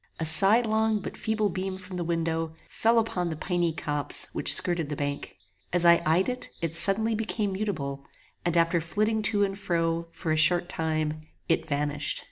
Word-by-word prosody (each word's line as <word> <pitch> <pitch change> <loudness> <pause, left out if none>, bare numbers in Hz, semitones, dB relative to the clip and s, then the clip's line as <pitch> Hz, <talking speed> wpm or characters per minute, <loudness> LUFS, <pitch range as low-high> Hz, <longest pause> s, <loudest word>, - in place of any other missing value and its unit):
A 160 - -1
sidelong 220 +6 +4
but 200 - -7
feeble 215 -1 -1
beam 185 +1 -4
from 185 0 -10
the 175 - -2
window, 165 -1 -2
fell 230 +1 +1
upon 185 -6 0
the 160 - -4
piny 175 +1 -1
copse 150 -2 0
which - - +1
skirted 170 -4 +3
the 150 - -3
bank. 145 -8 -5 0.3
As 175 -1 +3
I 170 0 +6
eyed 170 +4 +3
it, 250 0 -4
it 165 -2 -3
suddenly 205 +6 +3
became 215 -2 -2
mutable, 145 -9 -4 0.4
and 175 0 0
after 170 0 +2
flitting 215 +6 -1
to 210 -1 +1
and 195 -1 -1
fro, 170 -4 -1
for 165 -2 -4
a - - +2
short 175 +3 +3
time, 155 -2 -2 0.3
it 165 - 0
vanished. 145 -1 -2
175 Hz, 180 wpm, -27 LUFS, 160-205 Hz, 0.4 s, I